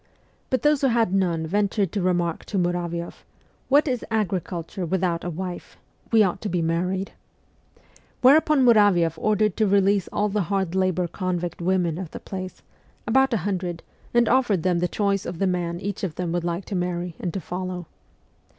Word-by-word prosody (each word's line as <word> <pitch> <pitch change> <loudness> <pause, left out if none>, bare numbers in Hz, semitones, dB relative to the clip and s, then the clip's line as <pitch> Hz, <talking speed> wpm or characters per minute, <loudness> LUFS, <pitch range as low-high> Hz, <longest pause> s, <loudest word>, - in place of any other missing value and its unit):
But 260 - 0
those 295 -1 +3
who 275 - +4
had 230 -6 +2
none 175 -4 +1
ventured 200 +1 0
to 205 - -2
remark 175 -2 0
to 205 - -3
Muravioff: 175 -1 -2 0.2
' - - -37
What 290 +3 +4
is 250 -3 -1
agriculture 185 -4 -2
without 175 -1 0
a 175 - -3
wife? 180 +1 -6 0.3
We 225 -2 +6
ought 185 -3 -1
to 210 - -3
be 175 - 0
married.' 180 +4 -1 1.1
Whereupon 285 +1 +5
Muravioff 190 -8 +4
ordered 215 -2 +1
to 215 - +3
release 200 -1 +2
all 210 - +1
the 210 +1 0
hard 190 -3 0
labour 185 -2 +1
convict 175 -1 -3
women 175 -2 +1
of 185 -4 -5
the - - -8
place 185 -1 -7 0.4
about 265 0 +3
a 230 - +2
hundred 180 -4 -3 0.3
and 240 -1 +3
offered 230 -9 +2
them 180 -2 +2
the 180 - +1
choice 200 0 0
of 175 - -5
the 195 - +1
man 175 -2 -1
each 200 +1 -5
of 170 -6 -2
them 180 -2 -3
would 175 0 -1
like 175 +2 -3
to 200 - -5
marry 175 -1 -2
and 175 - -3
to - - -1
follow. 180 0 -5
185 Hz, 185 wpm, -24 LUFS, 175-205 Hz, 1.1 s, We